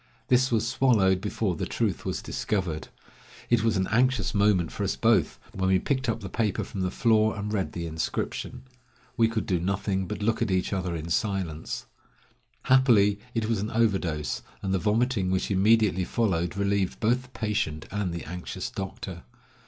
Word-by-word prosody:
This 130 +1 +4
was 115 -1 +1
swallowed 105 -8 +3
before 105 -2 -1
the - - -3
truth - - -1
was - - -3
discovered. 90 -7 -2 0.6
It 120 -2 +4
was 115 -3 +2
an 95 - +1
anxious 125 -1 +2
moment 100 -5 +3
for - - -4
us - - 0
both - - +2 0.2
when 95 -2 0
we 95 - +5
picked 130 +5 -1
up 115 0 -1
the 100 - -5
paper 105 -3 -1
from 95 - -5
the 90 - 0
floor 110 +1 +2
and 105 +1 -3
read 95 -3 -1
the 85 -1 -4
inscription. 80 -1 -3 0.5
We 115 -3 +4
could 115 -1 -2
do 90 -2 0
nothing 95 +1 -1
but 105 - -4
look 115 +2 +1
at 115 - +1
each 95 0 0
other 90 -3 -2
in 80 +1 -5
silence. 95 -7 -2 0.8
Happily 115 -6 +4 0.2
it 110 -1 0
was 115 -2 0
an 105 +2 -2
overdose, 95 -10 0 0.2
and 95 -1 -1
the 95 - +2
vomiting 110 -1 +1
which 95 +2 0
immediately 100 -1 +3
followed 90 -4 0
relieved 100 -1 0
both 120 +3 +2
the 125 - -17
patient 105 -10 -2
and 100 -3 -1
the 85 -1 -5
anxious 90 +3 -5
doctor. 95 -2 -6
100 Hz, 180 wpm, -27 LUFS, 95-115 Hz, 0.8 s, we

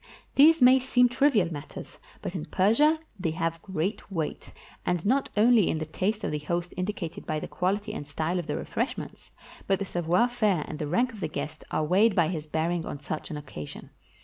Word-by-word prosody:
These 305 0 +6
may 255 +1 +8
seem 250 -1 +3
trivial 245 - +2
matters, 145 0 -9 0.2
but - - -4
in 170 -5 -4
Persia 230 +12 +3 0.2
they 175 -3 0
have 165 0 -1
great 190 +3 -3
weight; 160 -5 -4 0.3
and 175 -1 -1
not 265 +6 +2
only 225 -1 +5
is - - 0
the 155 - -3
taste 200 +7 -2
of - - -1
the 150 - -2
host 170 +3 -3
indicated 185 -3 -4
by 155 -1 -1
the - - -6
quahty 205 +4 -1
and 145 -9 -6
style 160 +5 -1
of 175 - -5
the - - -2
refreshments, - - -4 0.4
but 195 - +3
the 200 - -3
savoir 175 +5 +2
faire 215 -9 +1
and 155 - -6
the 150 - -2
rank 240 - +1
of 215 - -10
the - - -1
guest 155 - -5
are - - 0
weighed 195 +7 +4
by 170 -4 +3
his 155 -4 -4
bearing 165 +2 -1
on 145 - -6
such 150 +2 -5
an 150 - -4
occasion. 130 - -8
180 Hz, 205 wpm, -27 LUFS, 160-220 Hz, 0.4 s, may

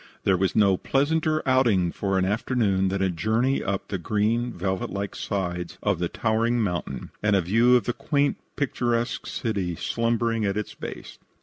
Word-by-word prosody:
There 95 - +3
was 95 +1 0
no 100 -3 +4
pleasanter 155 - +1
outing 115 -10 +3
for 95 -1 -1
an 95 - +2
afternoon 100 -2 +1
than 95 +1 0
a 95 - +2
journey 110 +9 +1
up 100 0 -3
the 95 - -2
green, 110 +6 0
velvet 95 +1 -2
like 100 0 -4
sides 90 -3 -3
of 100 -5 +1
the 85 -1 -1
towering 115 +2 +1
mountain 85 - -3
and 105 -1 +3
a 95 - +3
view 115 +8 +4
of 120 - +3
the 120 - -1
quaint, 145 +2 0 0.2
picturesque 120 -3 -1
city 100 -7 -2
slumbering 115 +2 0
at 100 0 0
its 105 - -4
base. - - -8
105 Hz, 175 wpm, -25 LUFS, 95-120 Hz, 0.2 s, no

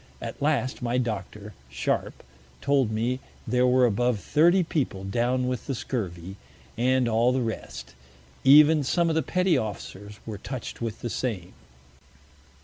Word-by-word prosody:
At - - -7
last, 140 -3 0
my 120 0 0
Doctor, 105 -3 -4 0.2
Sharp, 65 -2 -2 0.4
told 140 -5 +2
me 115 +4 -1 0.3
there 125 +2 +2
were 125 0 +4
above 120 0 +1
Thirty 175 - +3
People 135 - -2
down 120 +5 0
with 125 -2 -3
the 135 - -2
Scurvy, 95 -7 -5 0.4
and 125 +1 +2
all 115 +2 +3
the 130 - 0
rest, 115 -3 -5 0.5
even 150 +2 +7
some 170 +5 +1
of 160 - 0
the 160 - +3
Petty 180 0 +1
Officers, 105 -2 -7
were 105 -3 -6
touch'd 130 -2 -6
with 115 -2 -4
the 120 - -3
same. 100 -9 -3
125 Hz, 145 wpm, -26 LUFS, 110-135 Hz, 0.5 s, even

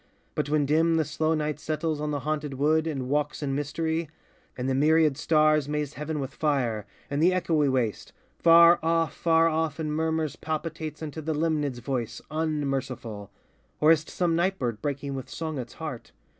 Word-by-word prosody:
but 145 - -2
when 150 -1 +2
dim 160 +3 +3
The 160 -1 +2
slow 155 +2 0
night 150 -1 -2
settles 155 0 -2
on 150 - -2
the 145 -1 -2
haunted 150 -1 -2
wood 155 +4 +2
And 135 -5 -3
walks 145 +2 -1
in 135 -1 -1
mystery; 160 +3 -2 0.5
and 125 0 -2
the 135 - +1
myriad 155 +1 +4
stars 155 0 +3
Maze 150 -1 -2
heaven 150 +1 -4
with 135 0 -4
fire; 120 -9 0 0.2
and 140 +1 0
the 170 - +6
echoy 165 -5 +2
waste, 125 -5 -1 0.3
Far 170 +1 +7
off, 165 0 +1
far 165 0 +3
off, 160 -1 -1
in 155 -1 -2
murmurs 160 -1 -1
palpitates 155 0 -4
Unto 155 +1 -5
the 155 0 -2
Limnad's 150 -4 0
voice, 120 -2 -3
unmerciful, 135 -9 -3 0.5
Or 155 +1 +6
is 160 -2 +4
't - - -13
some 175 -2 +1
night 185 +3 +1
bird 115 -4 -3
breaking 140 -1 -3
with 130 -1 -6
song 160 -3 -4
its 120 -2 -7
heart? 150 -7 -7
150 Hz, 185 wpm, -27 LUFS, 140-160 Hz, 0.5 s, Far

